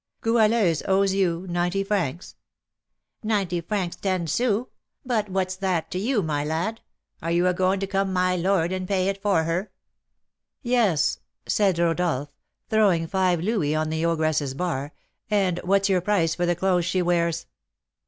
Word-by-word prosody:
"Goualeuse 220 -7 +3
owes 195 0 +3
you 185 -2 0
ninety 175 +2 0
francs?" 185 -6 -2 0.9
"Ninety 195 -6 0
francs 180 -1 -2
ten 185 -3 -1
sous; 230 - 0 0.4
but 220 -5 0
what's 185 -1 -1
that 185 -4 -1
to 180 - -2
you, 220 0 0
my 150 -2 -1
lad? 170 +9 -2 0.4
Are 165 - -3
you 170 +1 +2
a 180 - +3
going 185 +2 +1
to - - 0
come 195 0 -1
'my 185 0 +1
lord,' 180 -1 +1
and 185 -1 -3
pay 190 -1 +1
it 195 0 -4
for 195 -6 +2
her?" 175 +5 -2 0.9
"Yes," 225 - +2 0.3
said 195 -4 +2
Rodolph, 165 -4 0 0.3
throwing 200 -7 +3
five 180 -1 +1
louis 180 -7 0
on 155 0 -1
the 160 +1 -1
ogress's 155 -4 0
bar, 145 -4 -2 0.4
"and 190 -4 +1
what's 195 +2 +2
your 190 -2 +2
price 175 -4 +1
for 175 0 -1
the 175 - +2
clothes 180 -1 +1
she 185 +1 0
wears?" 170 -1 0
185 Hz, 160 wpm, -24 LUFS, 170-195 Hz, 0.9 s, Goualeuse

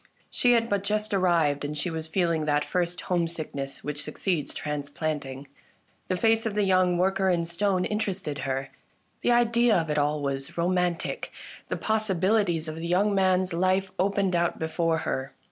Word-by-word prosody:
She 245 -1 +4
had 230 -1 +2
but 200 -3 0
just 210 +1 -1
arrived, 170 -7 +2
and 150 +1 -4
she 175 +4 -2
was 160 -1 -3
feeling 165 -2 0
that 145 -1 +1
first 175 -1 -1
home 175 -2 0
sickness 145 -4 -4
which 145 0 -4
succeeds 155 0 -2
transplanting. 145 -2 -4 0.6
The 185 - 0
face 225 +2 +3
of 210 - -4
the 210 - +2
young 185 -2 +3
worker 190 +1 +2
in 170 -2 +1
stone 180 +2 0
interested 195 -8 -2
her; 135 0 -3 0.5
the - - +2
idea 240 -1 +4
of 160 -2 -1
it 150 - +1
all 150 +1 +1
was 135 +1 -3
romantic; 175 0 -1 0.4
the - - -2
possibilities 200 -5 +1
of 155 0 -5
the 165 +1 -4
young 195 +4 +2
man's 185 -1 +2
life 185 +2 +1
opened 195 -1 +1
out 170 0 +1
before 165 0 0
her. 130 +1 -3
175 Hz, 170 wpm, -27 LUFS, 155-195 Hz, 0.6 s, She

